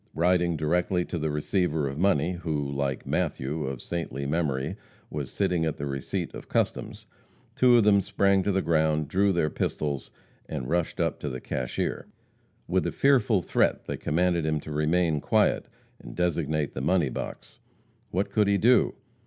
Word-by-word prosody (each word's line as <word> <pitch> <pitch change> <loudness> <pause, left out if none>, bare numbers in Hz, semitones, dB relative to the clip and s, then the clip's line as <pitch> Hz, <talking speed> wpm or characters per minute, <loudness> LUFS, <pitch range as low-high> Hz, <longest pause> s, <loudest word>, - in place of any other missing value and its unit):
Riding 85 0 +2
directly 90 +3 +1
to 85 - -4
the 80 0 -1
receiver 75 0 0
of 70 +2 -5
money, 90 -3 +2
who, 80 -5 -3
like 70 -1 -2
Matthew, 75 +4 -1
of 65 -2 -5
saintly 75 -5 -4
memory, 70 -3 -1 0.4
was 75 -3 -4
sitting 90 -4 0
at 80 -2 -1
the 70 - -4
receipt 70 -2 -3
of - - -9
customs, - - -1 0.5
two 125 -1 +6
of 115 - +5
them 100 -1 +5
sprang 100 0 +2
to 100 - 0
the 95 0 +1
ground, 80 -2 +2
drew 100 +4 +2
their 80 -4 +1
pistols, 70 -3 -2 0.4
and 65 - -4
rushed 85 +2 -1
up - - 0
to 75 - -3
the 65 -1 -5
cashier. 60 0 -3 0.6
With - - +1
a - - -1
fearful 120 -9 +3
threat - - +1
they - - -3
commanded 85 +2 +1
him 80 0 0
to 75 - -8
remain 75 +1 +1
quiet, - - +2 0.3
and - - -10
designate 80 -4 0
the 65 - -4
money 85 0 +2
box. - - -7 0.5
What 95 +4 -1
could 105 -2 +3
he 100 0 +3
do? 120 +2 +4
80 Hz, 170 wpm, -27 LUFS, 75-90 Hz, 0.6 s, two